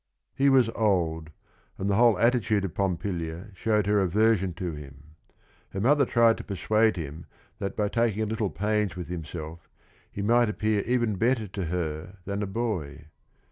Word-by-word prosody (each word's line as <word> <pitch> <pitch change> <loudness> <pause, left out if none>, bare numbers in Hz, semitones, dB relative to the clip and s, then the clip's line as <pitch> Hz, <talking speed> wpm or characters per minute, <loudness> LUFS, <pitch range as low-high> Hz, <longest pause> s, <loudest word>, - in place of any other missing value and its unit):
7 135 - +1
He - - +7
was 130 -3 +5
old, 85 -8 0 0.5
and 95 - -3
the 100 - +2
whole 115 -2 +5
attitude 115 -2 +2
of 90 - -5
Pompilia 90 -1 -3
showed 105 +1 +1
her 105 0 +3
aversion 95 0 +2
to 90 0 -3
him. 75 0 -12 0.6
Her 95 - -3
mother 140 +6 +4
tried 115 -1 +4
to - - -6
persuade 110 +2 +1
him 80 0 -7 0.3
that 100 -1 -3
by 105 -1 +1
taking 110 -1 0
a - - 0
litde 110 -2 -2
pains 105 -1 0
with 90 -2 -6
himself 80 -1 -7 0.4
he 100 - -4
might 120 +2 +3
appear 105 -1 0
even 120 -4 +1
better 115 0 +1
to 95 -1 -4
her 85 +2 -4
than 100 +1 -3
a 105 - -2
boy. 85 - -4
100 Hz, 175 wpm, -27 LUFS, 85-110 Hz, 0.6 s, He